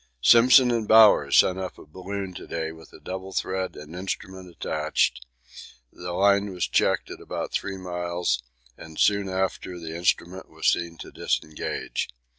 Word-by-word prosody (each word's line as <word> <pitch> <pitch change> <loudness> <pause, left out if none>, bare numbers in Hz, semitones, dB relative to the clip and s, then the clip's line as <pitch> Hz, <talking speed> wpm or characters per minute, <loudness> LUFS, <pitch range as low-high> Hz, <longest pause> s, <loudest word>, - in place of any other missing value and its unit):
Simpson 125 +1 +7
and 115 -3 -1
Bowers 110 -1 +6
sent 95 0 +4
up 95 -1 -6
a - - -13
balloon 95 +4 -6
to - - -10
day 80 -1 -3
with 80 0 -15
a - - -14
double 95 +1 -7
thread 95 0 -2
and 75 +3 -10
instrument 95 0 -6
attached; 65 -6 -1 0.7
the 90 0 -7
line 100 +2 +3
was 90 -2 -2
checked - - +1
at - - -9
about - - -5
3 100 -1 -3
miles, 90 -7 -2 0.3
and 80 -1 -12
soon 100 -2 +2
after 95 -1 -2
the 80 -1 -7
instrument 90 +1 -1
was - - -8
seen 85 -1 +1
to - - -10
disengage. 75 0 -3
95 Hz, 160 wpm, -25 LUFS, 85-100 Hz, 0.7 s, Simpson